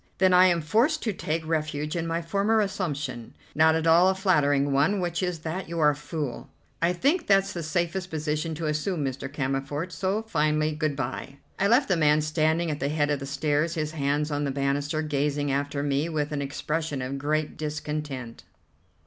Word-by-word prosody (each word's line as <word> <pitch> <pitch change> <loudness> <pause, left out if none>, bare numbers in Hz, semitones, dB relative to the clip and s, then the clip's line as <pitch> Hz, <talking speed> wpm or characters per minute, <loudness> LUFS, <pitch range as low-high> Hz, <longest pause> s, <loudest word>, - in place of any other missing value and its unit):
"Then 185 -1 +4
I 180 +1 +7
am 170 -2 +2
forced 235 - +2
to 220 - 0
take 160 -2 -3
refuge 155 -1 -2
in 165 -1 -2
my 165 +1 -1
former 200 +6 +1
assumption, 150 - -3 0.2
not 160 +1 +4
at 160 0 -1
all 170 +3 +6
a 190 - +1
flattering 145 -7 +2
one, 150 +9 +2
which 175 0 -1
is 180 -2 -1
that 165 +3 -4
you're 160 -3 +3
a - - -5
fool." 150 -3 -5 0.3
"I 170 +1 +3
think 285 - +1
that's 195 0 +3
the 170 - -4
safest 175 +3 -2
position 155 0 -2
to 160 +1 -4
assume, 155 +1 -1
Mr. 135 +1 -4
Cammerford; 140 +4 -2
so, 195 +4 -1
finally, 155 -6 +1
good 150 -1 -1
bye." 135 0 -5 0.2
I 200 - +3
left 245 +6 +4
the 185 - +2
man 150 -1 +4
standing 155 +2 +1
at 145 - -4
the 140 - -1
head 150 -1 +1
of 145 - 0
the 135 - -6
stairs, 150 +3 0
his 155 -1 -2
hands 150 0 -1
on 145 0 -1
the 140 - -1
banister, 140 +3 -1
gazing 145 -1 0
after 140 +1 -1
me 145 +3 0
with 150 -2 -2
an 145 -1 -2
expression 145 0 -3
of 135 +2 -4
great 150 +2 -1
discontent. 150 -5 -5
155 Hz, 195 wpm, -26 LUFS, 145-170 Hz, 0.3 s, I